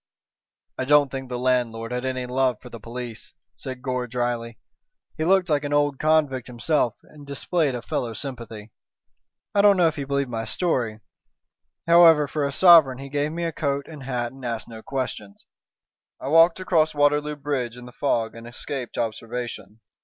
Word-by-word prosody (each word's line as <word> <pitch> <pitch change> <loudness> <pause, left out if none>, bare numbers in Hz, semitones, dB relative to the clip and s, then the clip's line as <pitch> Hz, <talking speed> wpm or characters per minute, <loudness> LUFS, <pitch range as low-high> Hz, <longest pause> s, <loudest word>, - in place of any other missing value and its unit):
"I 130 - -1
don't 145 -1 +4
think 135 -1 -6
the 125 - -3
landlord 120 -2 0
had 125 +1 -3
any 130 -1 -2
love 125 -1 +1
for 125 - -13
the 115 - -8
police," 120 0 -8 0.2
said 130 -1 -8
Gore, 125 -1 -2
dryly. 120 -1 -3 0.6
"He 155 - -2
looked 185 +1 +3
like 150 -3 +1
an 145 0 -3
old 145 -2 +1
convict 150 -5 +1
himself 125 0 0
and 150 -1 -15
displayed 140 0 -1
a 120 - -6
fellow 115 -2 -3
sympathy. 115 -3 -7 0.8
I 200 - +4
don't 200 -1 +6
know 175 - +4
if 160 -1 +1
he 140 - -2
believed 140 -2 -1
my 115 -1 -2
story. 120 -8 -1 0.8
However, 165 -3 +6
for 150 +1 -2
a - - -4
sovereign 160 -5 +7
he 135 +1 -8
gave 145 +2 -1
me 170 +1 -4
a 165 - -1
coat 140 -2 -2
and 155 -3 -10
hat, 125 -3 -3
and 135 0 -14
asked 115 -2 -4
no 110 -1 -10
questions. 110 -7 -5 0.7
I 135 - -5
walked 165 +3 +5
across 160 -4 +1
Waterloo 145 +1 +2
Bridge 135 -5 -3
in 125 - -10
the 125 - -11
fog 115 -4 -1
and 115 0 -10
escaped 125 +1 -6
observation. 115 0 -5
130 Hz, 180 wpm, -24 LUFS, 120-150 Hz, 0.8 s, sovereign